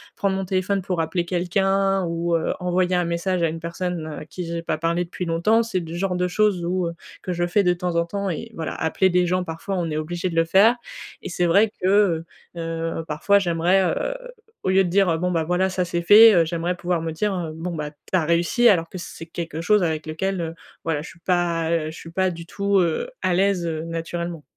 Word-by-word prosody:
prendre 195 -1 0
mon 195 - -2
téléphone 190 +1 0
pour 180 -2 -1
appeler 170 +2 -1
quelqu'un, 195 +2 +1
ou 170 0 -1
heu, 165 - 0
envoyer 180 0 +1
un 175 -1 +1
message 170 +1 -1
à - - +4
une 165 +1 -5
personne 170 -1 -4
à 155 -1 -7
qui 175 +3 -6
j'ai 170 0 -4
pas 155 -2 -1
parlé 170 +2 0
depuis 180 +1 -5
longtemps, 175 +8 +2
c'est 210 -5 -2
le 165 0 -8
genre 185 0 -1
de 180 0 0
chose 190 -2 +1
où 180 0 0
heu, 170 - -4 0.3
que 180 - -2
je 175 0 0
fais 200 +4 +2
de 180 -1 +3
temps 175 -1 -3
en 170 - +2
temps 200 +2 -3
et 225 +8 -5
voilà. 160 -1 -4
Appeler 175 +4 +1
des 180 0 +3
gens, 185 +1 +1
parfois 165 +4 -5
on 170 -2 -1
est 150 - -2
obligé 175 +4 -3
de 165 - -6
le 165 0 +3
faire. 200 +8 +5 0.5
Et - - -6
c'est 175 0 0
vrai 200 +6 +4
que, 185 - +1 0.7
heu, - - -7
heu, 165 0 -3
parfois 200 +7 +3
j'aimerais, 175 +1 +2
heu, - - -2 0.5
au - - 0
lieu 190 +1 +4
de 175 - -2
dire: 180 -3 +3
«Bon, 180 +1 0
bah, 165 -2 +1
voilà 180 +3 +1
ça 185 -1 -1
c'est 170 0 -2
fait», 215 +4 +9
heu, 170 -2 +4
j'aimerais 170 +2 -2
pouvoir 175 -1 -1
me 165 -1 -3
dire: 175 -2 -2
«Bon 170 +1 -4
bah 150 -1 -4
tu 150 - -31 0.2
as 180 -4 +3
réussi», 170 +9 +3
alors 165 -5 +2
que - - -7
c'est 165 - -8
quelque 165 -1 -5
chose 210 +1 +3
avec 160 -2 -1
lequel, 185 +4 -2
heu, 165 0 -4 0.3
voilà, 160 -3 -1
je 160 - -9
suis - - -16
pas 170 -3 0
je 160 - -9
suis 165 - -10
pas 185 +1 +1
du 170 0 -8
tout, 200 +1 +1
heu, 175 - 0
à 185 - +1
l'aise, 190 -1 +2
heu, 160 -1 -3
naturellement. 165 -1 -4
175 Hz, 240 wpm, -23 LUFS, 165-185 Hz, 0.7 s, fait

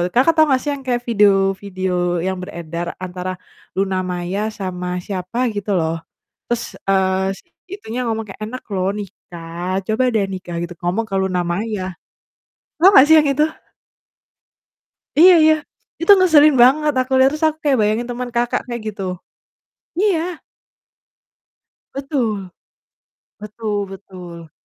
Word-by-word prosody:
Kakak 265 +7 +5
tau 315 - +6
nggak 265 -3 +2
sih 295 - -2
yang 275 -1 -7
kayak 245 -1 0
video-video 195 -3 +1 0.3
yang 190 0 -2
beredar 170 -2 -6 0.2
antara 185 0 -4 0.4
Luna 190 -1 0
Maya 180 +3 -3 0.2
sama 180 -2 -4 0.2
siapa 190 +4 -5
gitu 205 -1 -4
loh, 165 0 -1 0.5
terus, 240 0 -1 0.2
eee, 190 0 +1
si - - -18 0.3
itunya 245 - -6
ngomong 225 -1 -1
kayak, - - -13
"Enak 255 +3 -7
loh 190 -1 0
nikah, 180 -2 -6
coba 220 +4 +1
deh 215 -2 +2
nikah," 180 -2 -6
gitu, 175 - -6
ngomong 185 +6 0
ke 195 - -3
Luna 190 -2 0
Maya. 210 +2 -2 1.0
Tau 370 - +9
nggak 265 - +9
sih 320 +2 +6
yang 300 - -1
itu? 290 +2 +3 1.7
Iya 360 +5 +8
iya, 315 0 +6 0.5
itu 335 - +5
ngeselin 310 -6 +6
banget, 300 +4 +4
aku 255 +1 -2
liat, 260 0 +5
terus 305 +2 -1
aku 310 0 -2
kayak 280 -3 +3
bayangin 215 +3 0
teman 245 0 -4
Kakak 240 0 0
kayak 240 -1 -5
gitu, 200 -1 -7 1.0
iya. 360 -4 0 1.5
Betul. 240 -9 -2 0.9
Betul 210 0 -4
betul, 180 -4 -11
210 Hz, 140 wpm, -19 LUFS, 185-260 Hz, 1.7 s, Tau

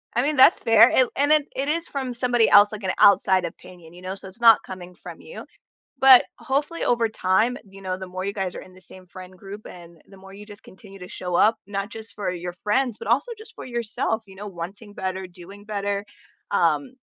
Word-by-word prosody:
I 240 - +3
mean 295 +2 0
that's 265 - +6
fair, 225 +1 +6
it 255 -2 +3
and 290 +2 +1
then, 305 -2 +4
it 275 +2 -2
is 330 +2 -1
from 265 -3 -4
somebody 240 -2 +2
else, 205 +1 +6
like 210 -1 -8
an 185 - 0
outside 190 -2 +5
opinion, 170 0 -12
you 180 - -14
know, 185 +1 -5
so 195 - -11
it's 190 +5 -15
not 230 -2 +7
coming 180 -1 -10
from - - -11
you, - - -11 0.6
but 265 -2 +8
hopefully, 290 +5 -2
over 235 -2 +1
time, 215 +5 +1
you 195 0 -14
know, 185 -1 -3
the 190 - -7
more 185 +1 -6
you 200 - -2
guys 190 -3 -4
are - - -7
in 185 - -16
the 185 - -17
same 185 0 -16
friend 185 +1 -12
group 200 +3 -11
and 170 -2 -13
the 195 - -16
more 195 0 -14
you 205 +1 -12
just 205 -2 -13
continue 195 0 -15
to 180 - -9
show 180 -1 -6
up, 220 +5 +4
not 200 +1 -4
just 220 -1 -11
for 205 -3 -3
your 175 0 -6
friends, 235 +2 0
but - - -8
also 280 - +1
just 440 +1 -14
for - - -10
yourself, 225 -2 -3
you 190 - -15
know, 205 +2 -8
wanting 195 +4 -9
better, 190 0 -4
doing 185 +3 -14
better, 205 -1 -3 0.5
um, 265 -2 0
205 Hz, 230 wpm, -23 LUFS, 185-235 Hz, 0.6 s, but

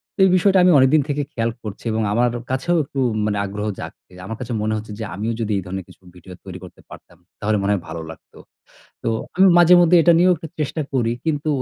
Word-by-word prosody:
তো - - -16
এই - - +4
বিষয়টা 190 +1 +3
আমি 180 - +5
অনেক 130 0 +5
দিন 155 - +4
থেকে 145 0 -1
খেয়াল 115 0 -1
করছি, 105 -3 -8
এবং 110 +1 -1
আমার 120 +2 +2 0.2
কাছেও 135 +7 0
একটু 135 0 -6 0.3
মানে 105 -1 -1
আগ্রহ 105 +2 -5
জাগ - - -6 0.2
এ - - -18
আমার 110 +2 -6
কাছে 125 -1 -5
মনে 110 +1 -1
হচ্ছে 110 0 -8
যে, - - -4
"আমিও 110 +4 -3
যদি 110 -1 -2
এই - - -2
ধরনের 95 0 -6
কিছু - - -18
ভিডিও 90 +1 -13
তৈরি 95 -1 -8
করতে 90 - -14
পারতাম! 85 - -15 0.2
তাহলে 105 +1 0
মনে 100 +1 0
হয় 100 - -2
ভালো 85 - -6
লাগতো।" 80 - -17 0.7
তো - - -2 0.3
আমি 190 +1 +6
মাঝেমধ্যে 175 0 +6
এটা 170 - +5
নিয়েও 180 +1 +5
একটু 160 +1 -9
চেষ্টা 150 +2 -2
করি। 120 -4 0
কিন্তু 155 -1 -2
115 Hz, 235 wpm, -20 LUFS, 105-160 Hz, 0.7 s, আমি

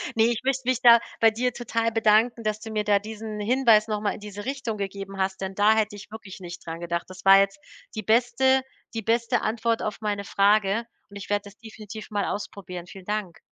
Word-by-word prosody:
Ne, 225 - +4
ich 235 -1 0
möchte 265 -1 -1
mich 255 -1 +1
da 235 -2 +8 0.2
bei 225 -1 +6
dir 250 +3 -1
total 230 -1 -1
bedanken, 225 +1 +3
dass 215 0 -1
du 220 0 -8
mir 215 -1 -1
da 205 -1 +3
diesen 215 0 -7
Hinweis 225 -1 +4
noch 210 -1 -2
mal 210 - 0
in - - -9
diese 205 0 -8
Richtung 260 -5 -3
gegeben 195 0 -6
hast, 190 0 -1
denn 190 0 -4
da 210 +2 +4
hätte 215 -1 0
ich 205 +1 -12
wirklich 210 -4 -10
nicht 175 -2 -9
dran 165 0 -6
gedacht. 170 0 -3
Das 185 +1 -12
war 195 0 +9
jetzt 195 +8 0 0.4
die 215 - -4
beste 245 +3 +3 0.3
die 225 - -3
beste 230 +2 +1
Antwort 225 +1 0
auf 210 0 -4
meine 205 -1 -2
Frage 205 +2 +2 0.2
und 200 - -14
ich 200 - -9
werde 205 0 0
das 200 +1 -13
definitiv 215 -1 -10
mal 205 -1 0
ausprobieren. 180 -4 -6
Vielen 190 -1 -12
Dank. 205 -4 -3
215 Hz, 220 wpm, -25 LUFS, 200-230 Hz, 0.4 s, war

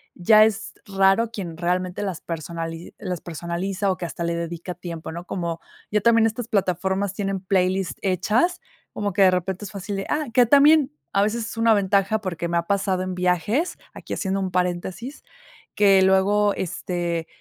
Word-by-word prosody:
ya 215 +4 +6
es 220 0 -2
raro 195 +3 +2
quien 175 -7 -6
realmente 180 +2 -1
las 190 -5 -4
personali 165 0 -6
las 180 -3 -4
personaliza 175 +4 -3
o 185 - -3
que 180 - -4
hasta 170 0 -5
le 170 0 -1
dedica 170 +1 -5
tiempo, 170 -2 -7
¿no? 170 +2 -7
Como 170 -2 -3 0.3
ya 210 0 +2
también 230 0 +5
estas 225 +1 -4
plataformas 190 0 0
tienen 195 -2 -2
playlist 185 -1 0
hechas 210 - +1 0.3
como 205 -1 -2
que 195 - +4
de 185 - +6
repente 185 +2 -2
es 195 - -8
fácil 200 0 -5
de 195 - -3
ah 300 -1 -1
que 245 0 +6
también 285 +2 +5 0.2
a 200 - +3
veces 220 +2 -1
es - - -8
una 225 0 +4
ventaja 200 +1 +2
porque 175 -4 -3
me 170 0 0
ha 170 0 -1
pasado 195 -2 0
en 185 -1 -4
viajes, 180 - 0 0.2
aquí - - -7
haciendo 195 -1 -1
un 190 -1 -2
paréntesis, 180 - -3 0.5
que 195 -2 +5
luego, 200 +2 +3
este, 170 -2 -3
190 Hz, 180 wpm, -23 LUFS, 175-210 Hz, 0.5 s, ya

